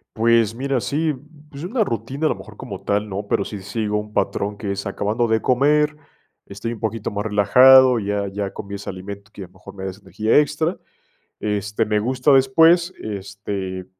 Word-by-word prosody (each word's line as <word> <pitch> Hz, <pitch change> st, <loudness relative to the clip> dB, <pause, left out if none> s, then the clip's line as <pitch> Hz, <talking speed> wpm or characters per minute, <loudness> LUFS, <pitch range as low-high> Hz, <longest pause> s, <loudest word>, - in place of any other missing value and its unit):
Pues, 115 Hz, -1 st, +3 dB
mira, 135 Hz, 0 st, -1 dB
sí. 155 Hz, +4 st, 0 dB, 0.4 s
Pues 140 Hz, +1 st, -9 dB
una 220 Hz, +6 st, 0 dB
rutina, 130 Hz, +5 st, -3 dB
a -, -, +4 dB
lo -, -, 0 dB
mejor, -, -, -13 dB
como -, -, -8 dB
tal, 105 Hz, +1 st, -1 dB
no. 100 Hz, +1 st, -5 dB
Pero 100 Hz, -, 0 dB
sí 105 Hz, -, -6 dB
sigo 105 Hz, +1 st, -2 dB
un 105 Hz, 0 st, -5 dB
patrón, 100 Hz, 0 st, -1 dB
que 100 Hz, 0 st, -4 dB
es 100 Hz, -, -5 dB
acabando 105 Hz, +4 st, -1 dB
de 110 Hz, -1 st, +1 dB
comer, 150 Hz, +4 st, +2 dB, 0.5 s
estoy 105 Hz, +4 st, -5 dB
un 115 Hz, -, -10 dB
poquito 110 Hz, -1 st, -3 dB
más 105 Hz, +1 st, -3 dB
relajado, 125 Hz, +5 st, +6 dB
ya 100 Hz, -1 st, -2 dB
ya 100 Hz, 0 st, -4 dB
comí 100 Hz, 0 st, -7 dB
ese 100 Hz, -, -7 dB
alimento 100 Hz, +2 st, -8 dB
que 100 Hz, -, -8 dB
a -, -, -10 dB
lo 90 Hz, -, -28 dB
mejor -, -, -13 dB
me 95 Hz, -1 st, -7 dB
da 95 Hz, -, -3 dB
esa 95 Hz, +3 st, -16 dB
energía 100 Hz, +3 st, +1 dB
extra. 150 Hz, +3 st, +1 dB, 0.6 s
Este, 105 Hz, +1 st, -1 dB
me 105 Hz, -1 st, +1 dB
gusta 130 Hz, +5 st, +1 dB
después, 165 Hz, +7 st, +5 dB
este, 100 Hz, -2 st, -5 dB
105 Hz, 195 wpm, -21 LUFS, 100-130 Hz, 0.6 s, relajado